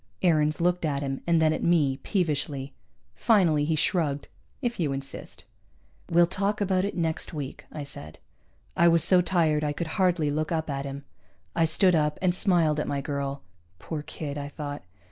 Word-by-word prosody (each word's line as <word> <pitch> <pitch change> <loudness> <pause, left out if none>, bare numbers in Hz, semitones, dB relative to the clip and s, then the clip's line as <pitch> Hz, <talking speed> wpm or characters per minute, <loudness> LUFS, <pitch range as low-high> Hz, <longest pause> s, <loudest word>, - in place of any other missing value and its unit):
Aarons 155 -3 +3
looked 180 +1 +1
at 145 -3 -1
him, 135 -1 -3
and 170 -1 +4
then 155 -1 +3
at - - -3
me, 150 -6 +2
peevishly. 145 -5 -2 0.4
Finally 175 -10 +3
he 160 +1 +1
shrugged. 150 -2 0 0.3
"If 240 -5 -2
you 150 -5 0
insist." 135 0 -7 0.6
"We'll 175 +1 +5
talk 200 +4 -1
about 190 -2 +1
it 200 - -4
next 160 -1 -2
week," 140 -3 -6
I 150 - -5
said. 80 - -8 0.6
I 170 - +5
was 165 -2 +4
so 180 +1 +5
tired 165 -4 +1
I 145 -1 0
could 170 +5 -3
hardly 175 -5 +2
look 155 +3 -2
up 160 -2 -1
at 140 0 -3
him. 140 0 -6 0.5
I 165 - +3
stood 180 +3 +4
up, 150 -2 +1
and 185 -1 +2
smiled 170 -5 +2
at - - -2
my 140 - -1
girl. 140 0 -3 0.3
Poor 155 - -5
kid, 145 -1 -6
I 140 0 -5
thought. 145 -1 -6
155 Hz, 185 wpm, -27 LUFS, 145-175 Hz, 0.6 s, We'll